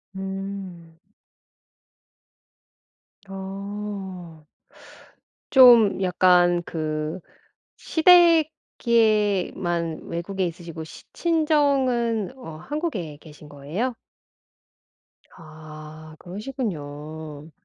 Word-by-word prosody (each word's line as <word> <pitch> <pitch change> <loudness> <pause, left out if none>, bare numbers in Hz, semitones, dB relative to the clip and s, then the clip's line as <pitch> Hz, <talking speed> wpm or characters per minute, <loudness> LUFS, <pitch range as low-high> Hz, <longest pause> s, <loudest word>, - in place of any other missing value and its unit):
음. 190 -3 -7 2.3
어. 195 -4 -7 1.0
좀 240 -7 +7
약간 180 -1 +3
그 155 +1 -3 0.6
시댁에만 225 - +2
외국에 185 +3 -3
있으시고 170 -1 -8
시 - - -13
친정은 275 - +1
어 160 -12 -9
한국에 205 - -4
계신 150 0 -15
거예요? 155 - -3 1.4
아 155 -1 -12
그러시군요. 160 - -7
185 Hz, 120 characters per minute, -24 LUFS, 160-230 Hz, 2.3 s, 좀